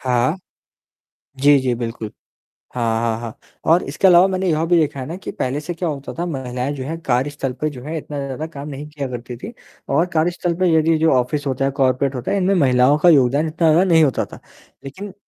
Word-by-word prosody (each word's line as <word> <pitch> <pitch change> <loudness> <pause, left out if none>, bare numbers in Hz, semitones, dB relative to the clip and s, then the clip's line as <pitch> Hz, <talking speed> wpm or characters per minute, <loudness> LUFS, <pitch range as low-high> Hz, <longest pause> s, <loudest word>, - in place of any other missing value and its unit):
हाँ। 125 +5 +1 1.0
जी, 145 +1 +6
जी, 130 -2 0
बिल्कुल। 115 -2 -5 0.6
हाँ, 115 -2 0
हाँ, 115 -1 -1
हाँ। 115 -2 -7 0.4
और 175 - +3
इसके 170 +7 +2
अलावा 180 +1 +7
मैंने 190 0 -1
यह 155 0 +1
भी 175 +1 +3
देखा 145 -3 -1
है 130 - -4
ना, 165 +5 -6
कि - - -7
पहले 130 +3 -2
से 175 +3 -5
क्या 170 0 -3
होता 140 -1 -6
था 175 - -1
महिलाएँ 130 -4 -3
जो 130 - -5
हैं 160 +4 -4
कार्यस्थल 135 -1 -1
पे 155 - +1
जो 130 -4 -10
है 160 +3 -4
इतना 150 -1 -6
ज़्यादा 140 +3 -5
काम 145 -2 -9
नहीं 145 +1 -7
किया 145 -2 -5
करती 120 -1 -7
थी 220 - -8 0.4
और 170 - +3
कार्यस्थल 170 +2 0
पे 185 - +3
यदि 160 0 +3
जो 160 +1 +3
ऑफ़िस 140 +4 -2
होता 135 0 -1
है, 135 - 0
कॉर्पोरेट 135 0 +1
होता 125 - -3
है, 200 - +1
इनमें 195 +1 +2
महिलाओं 130 -2 +4
का 175 +3 +5
योगदान 140 +1 +4
इतना 160 +1 +1
ज़्यादा 170 +4 +4
नहीं 160 -1 +5
होता 140 -4 +1
था। - - -13 0.4
लेकिन 185 +8 -8
145 Hz, 225 wpm, -20 LUFS, 130-165 Hz, 1.0 s, अलावा